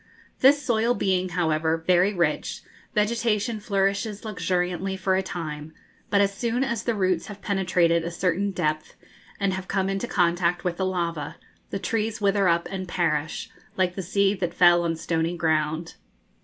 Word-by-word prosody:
This 280 +3 +6
soil 235 -2 +1
being, 185 -2 0
however, 160 -2 +1
very 180 +2 +4
rich, 175 -4 -1 0.3
vegetation 215 0 +1
flourishes 200 +1 -1
luxuriantly 185 -2 -1
for 190 0 +1
a 190 - +2
time; 160 -4 -6 0.4
but 200 - +4
as 200 0 +2
soon 235 +5 -1
as 235 -5 -1
the 235 -1 -1
roots 185 -4 0
have 205 -1 -10
penetrated 180 -4 +2
a 170 - -3
certain 180 +3 0
depth, 155 -5 -2 0.4
and 195 -1 +1
have 190 0 -5
come 190 +1 0
into 195 +4 -2
contact 175 -1 +1
with 175 -1 -2
the 190 - 0
lava, 170 -5 -2 0.3
the - - -3
trees 220 +1 -2
wither 200 -1 +2
up 170 0 +2
and 190 -1 -4
perish, 160 -4 -1 0.3
like 185 -1 +2
the 190 - -4
seed 195 +2 +1
that 175 -2 -2
fell 175 -1 +6
on 165 -1 0
stony 165 +1 -1
ground. 160 0 0
185 Hz, 165 wpm, -25 LUFS, 170-200 Hz, 0.4 s, This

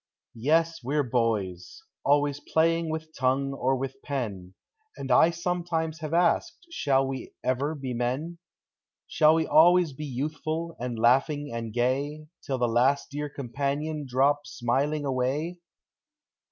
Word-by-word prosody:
Yes, 165 +3 +2
we 135 +5 -2
're 145 - +3
boys, 110 - -2
— - - -65
always 145 0 +2
playing 165 +2 +1
with 160 0 -5
tongue 135 +1 +1
or 135 0 +1
with 135 +1 -5
pen; 100 -10 -4 0.4
And 135 -1 -4
I 160 +6 +6
sometimes 170 -2 -2
have 155 -2 -5
asked. 175 - +1
Shall 135 - +2
we 135 0 -6
ever 140 +5 0
be 135 -3 -5
men? 130 +8 -2 0.7
Shall 155 +1 +4
we 160 0 +1
always 175 -1 +5
be 150 +3 -6
youthful, 155 +5 -3
and 120 -1 -4
laughing, 135 +5 +2
and 115 -1 -4
Till 140 +3 -2
the 120 -1 +1
last 130 +6 +2
dear 145 +1 -4
companion 145 +3 -3
drop 140 +3 +2
smiling 140 +5 -1
away? 140 +7 -1
140 Hz, 140 wpm, -27 LUFS, 130-160 Hz, 0.7 s, I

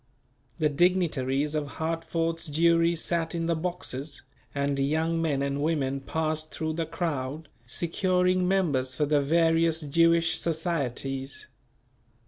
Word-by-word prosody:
The 155 -2 +2
dignitaries 150 -4 +1
of 150 -2 -1
Hartford's 165 0 -2
Jewry 165 +2 +3
sat 165 0 -1
in 165 -1 -1
the 170 - +1
boxes, 160 -4 -4 0.3
and 140 0 0
young 160 +4 +1
men 145 -4 0
and 140 0 -1
women 140 -4 0
passed 155 +2 -2
through 160 0 -2
the 165 0 -2
crowd, 155 -3 -3 0.2
securing 180 +5 +1
members 145 -10 +1
for 150 - +1
the 145 0 +2
various 165 +2 +3
Jewish 165 +2 +3
societies. 135 -5 -2
160 Hz, 120 wpm, -27 LUFS, 140-165 Hz, 0.3 s, Jewry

